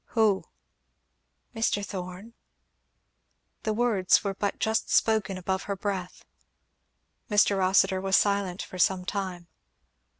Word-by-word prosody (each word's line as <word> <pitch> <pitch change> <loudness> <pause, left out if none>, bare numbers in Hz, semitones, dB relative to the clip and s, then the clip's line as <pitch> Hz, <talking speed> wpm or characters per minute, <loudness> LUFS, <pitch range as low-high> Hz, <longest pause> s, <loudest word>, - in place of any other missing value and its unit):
"Who?" 210 -4 +3 1.1
"Mr. 215 -2 0
Thorn." 185 +4 -7 1.3
The 220 - -1
words 215 -5 +2
were 200 -1 -1
but 200 +1 -2
just 220 0 0
spoken 215 -4 +2
above 190 +1 -2
her 200 - 0
breath. 190 -2 -5 1.0
Mr. 205 -1 +4
Rossitur 190 0 +3
was 195 0 +3
silent 200 -3 0
for 185 - -10
some 180 0 +2
time. 185 -3 -4
195 Hz, 110 wpm, -27 LUFS, 185-205 Hz, 1.3 s, Mr